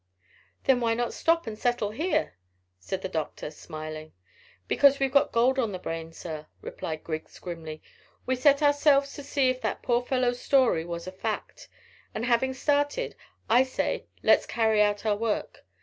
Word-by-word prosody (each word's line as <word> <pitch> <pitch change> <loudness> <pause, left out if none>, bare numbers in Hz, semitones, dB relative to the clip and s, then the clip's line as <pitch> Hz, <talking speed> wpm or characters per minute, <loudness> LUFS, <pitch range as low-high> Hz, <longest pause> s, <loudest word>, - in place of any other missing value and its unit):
"Then 265 -2 +4
why 230 -1 +1
not 240 0 -1
stop 330 0 +2
and 220 -2 -5
settle 240 -2 0
here?" 270 - 0 0.5
said 185 - -5
the - - -1
doctor, 155 -3 -4
smiling. 155 0 -8 0.5
"Because 280 -1 +5
we've 270 -1 0
got 280 +1 +3
gold 255 +3 +3
on 225 -5 0
the - - -3
brain, 165 -2 -5
sir," 155 -2 -7
replied 155 -1 -6
Griggs 155 -1 -6
grimly. 160 -3 -7 0.4
"We 260 - +1
set 280 +3 +4
ourselves 285 -1 +4
to - - -7
see 275 -2 +2
if 255 0 -6
that - - -3
poor 240 -1 +2
old 245 0 -4
fellow's 250 -2 +1
story 255 -12 +3
was 170 0 -5
a 185 - -6
fact, 190 - -5 0.5
and 225 - -2
having 250 +2 +2
started, 290 - 0 0.3
I 240 +3 +5
say 260 0 -2 0.2
let's - - +4
carry 220 -2 +2
out 205 0 +1
our 210 -1 +2
work. 220 0 -3
235 Hz, 175 wpm, -27 LUFS, 175-265 Hz, 0.5 s, Because